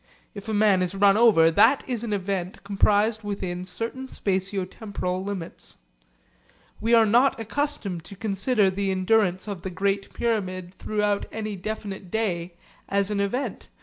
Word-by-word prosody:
If 200 +1 -8
a - - -1
man 205 -3 +4
is 180 +1 -1
run 195 0 +5
over, 210 -8 +6
that 225 - +5
is 240 -3 -1
an 230 - -3
event 190 -2 -3
comprised 205 +2 +2
within 185 -3 -4
certain 230 +8 -5
spatio 190 -4 -1
temporal 185 -3 -4
limits. 195 -4 -7 1.0
We 230 +2 +3
are 225 -1 +6
not 240 +4 +3
accustomed 225 - -2
to 200 - -10
consider 205 0 +1
the 195 +1 -1
endurance 190 0 +2
of 200 -4 -5
the 190 - -4
Great 195 +2 -1
Pyramid 185 -6 -2
throughout 210 0 -1
any 215 -2 -4
definite 195 -1 -6
day 180 -5 -2 0.3
as 200 +1 +1
an 205 - 0
event. 200 +7 -2
200 Hz, 150 wpm, -25 LUFS, 185-220 Hz, 1.0 s, over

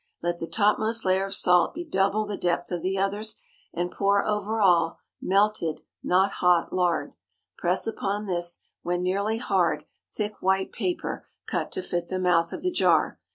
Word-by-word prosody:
Let 175 0 -1
the 165 - -4
topmost 220 +3 +1
layer 190 +1 +2
of 195 0 -1
salt 180 - +3
be 345 +1 -5
double 215 - +1
the 205 -1 -4
depth 175 -1 -1
of 175 -1 -2
the 190 +2 -1
others, 205 +3 -1 0.4
and 175 +1 -2
pour 200 0 +1
over 210 +1 -1
all 175 -5 +3 0.2
melted—not 195 -1 +1
hot—lard. 175 -3 +1 0.4
Press 180 +2 0
upon 205 -1 -2
this, 175 -2 0 0.2
when 175 0 -1
nearly 200 +4 0
hard, 190 -7 +1 0.3
thick 210 -1 -4
white 190 0 +1
paper, 350 -3 -3 0.2
cut - - -2
to 380 -4 -3
fit 175 - -3
the 185 - -3
mouth 175 -2 +2
of - - -6
the 365 - +1
jar. 350 - +2
190 Hz, 160 wpm, -26 LUFS, 175-210 Hz, 0.4 s, salt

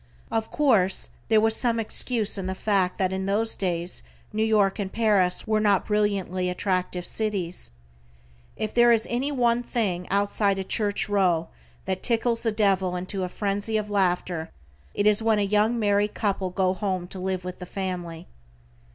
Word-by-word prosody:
Of 225 0 -1
course 215 -11 +2 0.2
there 220 -1 +4
was 220 +1 +3
some 235 -1 +1
excuse 225 0 +1
in 190 -2 -4
the 190 - -3
fact 190 -2 0
that 190 -1 0
in 190 0 -3
those 220 +3 +3
days 175 -2 -2 0.3
New 215 - -1
York 210 -3 +2
and 195 -2 -3
Paris 205 -5 +2
were 215 -1 +1
not 205 -3 +2
brilliantly 195 -3 0
attractive 180 -1 -2
cities. 200 -5 -2 0.9
If 215 - -4
there 240 0 +5
is 225 -1 +3
any 260 +5 -1
one 240 -3 +2
thing 195 -8 -2
outside 200 0 +1
a 190 - -2
church 205 +1 0
row, 180 -5 +1 0.4
that 190 -1 -2
tickles 230 0 +1
the 225 - +1
devil 195 -4 +1
into 185 +2 -3
a 180 - -3
frenzy 205 +3 -2
of 210 -1 -4
laughter 180 -4 0 0.5
it 205 - 0
is 210 0 +5
when 220 -1 +2
a 205 - +1
young 210 +4 +2
married 205 -1 +1
couple 195 -3 -1
go 185 0 +1
home 185 -2 -3
to 190 - -7
live 185 -1 -3
with 180 0 -6
the 180 - -8
family. 180 -3 -5
200 Hz, 175 wpm, -25 LUFS, 185-220 Hz, 0.9 s, there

